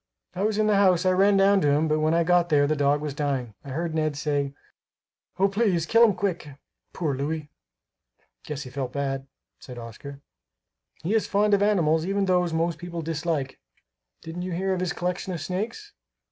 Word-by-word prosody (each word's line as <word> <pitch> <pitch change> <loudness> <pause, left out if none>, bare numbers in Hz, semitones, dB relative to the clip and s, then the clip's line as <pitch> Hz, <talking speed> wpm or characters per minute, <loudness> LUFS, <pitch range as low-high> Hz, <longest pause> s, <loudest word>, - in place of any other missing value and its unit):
"I 185 - -4
was 210 0 +1
in 215 - +2
the 210 -1 +3
house; 185 -2 +4
I 185 - +4
ran 195 +2 +4
down 195 0 +4
to 145 - +3
him, 150 +3 +2
but 155 0 +1
when 155 +1 +2
I 170 - +3
got 175 0 +3
there 145 -3 +4
the 155 +2 +1
dog 145 0 +2
was 150 -2 -3
dying. 135 -5 -2
I 140 - -10
heard 160 +4 -3
Ned 155 -2 -1
say, 145 -2 -1 0.8
'Oh! 195 +1 +4
please 195 -5 +1
kill 230 +6 +5
him 215 -5 +4
quick. 175 -7 -3 0.4
Poor 155 -5 -2
Louis!'" 150 +2 -4 0.9
"Guess 150 -1 -5
he 130 - -10
felt 130 -1 -4
bad," 135 -1 -3 0.3
said 125 -2 -10
Oscar. 120 +4 -9 0.8
"He 185 +6 -1
is 225 - +1
fond 210 +1 +2
of 200 - +4
animals, 170 -6 +2
even 200 0 +1
those 180 -2 +2
most 165 +1 -1
people 170 -1 -6
dislike. 160 -4 -2 0.6
Didn't 165 +2 -6
you 180 0 -4
hear 190 +2 0
of 185 - -2
his 180 -1 -1
collection 180 +2 -3
of 170 - -4
snakes? 220 - -4
165 Hz, 200 wpm, -25 LUFS, 145-190 Hz, 0.9 s, kill